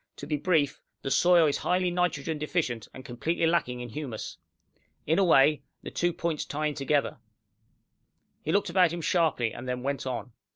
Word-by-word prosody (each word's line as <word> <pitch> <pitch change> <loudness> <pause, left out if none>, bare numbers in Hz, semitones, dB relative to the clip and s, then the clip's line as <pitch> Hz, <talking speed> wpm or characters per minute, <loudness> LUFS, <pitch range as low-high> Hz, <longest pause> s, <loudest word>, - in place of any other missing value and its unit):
To - - -8
be 150 - -1
brief, 150 -2 +1 0.2
the 135 - -3
soil 175 +4 +5
is 145 - +1
highly 180 0 +1
nitrogen 165 -3 -1
deficient, 150 -8 -2
and 130 - -11
completely 165 +8 -1
lacking 125 -7 +1
in 120 - -6
humus. 120 -3 -6 0.7
In 160 +4 +2
a - - +5
way, 150 -4 +5 0.2
the - - -7
two 175 0 +1
points 165 -2 -2
tie 150 +2 -3
in 150 - 0
together." 140 0 0 1.2
He 155 - -2
looked 200 +3 +1
about 180 -4 +4
him 170 0 -4
sharply, 155 -9 +1
and 125 +2 -7
then 125 0 -3
went 140 0 -2
on. 125 0 -4
150 Hz, 180 wpm, -28 LUFS, 135-170 Hz, 1.2 s, soil